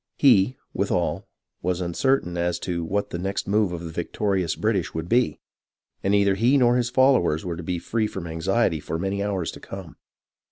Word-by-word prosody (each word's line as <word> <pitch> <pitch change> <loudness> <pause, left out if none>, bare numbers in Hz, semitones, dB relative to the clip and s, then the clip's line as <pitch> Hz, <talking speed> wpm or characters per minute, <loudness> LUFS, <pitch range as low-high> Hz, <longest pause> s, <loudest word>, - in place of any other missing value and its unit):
He, 125 -3 +5 0.2
with - - -1
all, - - -1 0.3
was 90 -1 -1
uncertain 90 +2 0
as 85 0 0
to 85 -2 -2
what 100 +5 -2
the 85 - -3
next 95 +2 -3
move 105 -1 +2
of 85 -1 -5
the 85 - -6
victorious 90 +1 -1
British 105 -7 -1
would 80 +1 -3
be, 120 +5 +2 0.6
and 95 - +1
neither 100 -1 +4
he 120 +8 +3
nor 120 -2 +4
his 120 -1 +1
fol 130 +2 +5
lowers 85 -9 +1
were 85 -2 -3
to 85 - -6
be 90 +1 -2
free 110 +5 -1
from 95 -4 -6
anxiety 80 +2 0
for 75 +2 -4
many 95 +3 -2
hours 100 -4 -1
to - - -11
come. 95 -4 -9
95 Hz, 200 wpm, -24 LUFS, 85-110 Hz, 0.6 s, He